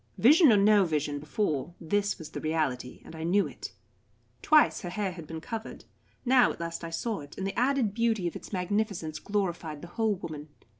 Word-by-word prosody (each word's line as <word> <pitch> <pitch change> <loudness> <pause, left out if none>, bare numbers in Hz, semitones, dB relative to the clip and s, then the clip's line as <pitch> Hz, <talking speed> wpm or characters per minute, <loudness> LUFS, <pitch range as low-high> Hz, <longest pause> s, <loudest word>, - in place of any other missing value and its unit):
Vision 295 - +7
or 210 - +6
no 205 0 +5
vision 150 -4 -1
before, 155 +1 -2
this 200 +4 0
was 160 -5 -9
the - - -5
reality, 150 -6 -2
and - - -10
I 160 - -6
knew 190 +5 +3
it. - - -8 0.7
Twice 310 -1 +4
her 175 - -5
hair 195 +1 -2
had 170 -3 -9
been 160 -1 -6
covered, 225 +4 -7 0.4
now 250 0 +5
at - - -9
last 170 0 -5
I 165 - -4
saw 205 +5 -2
it, 145 -1 -12
and 190 - -3
the 195 - -2
added 250 -5 +2
beauty 225 -4 +1
of 170 - -5
its - - -9
magnificence 185 -4 -2
glorified 175 -7 -3
the 175 - -8
whole 220 +1 0
woman. 155 -4 -7
180 Hz, 200 wpm, -29 LUFS, 160-215 Hz, 0.7 s, Vision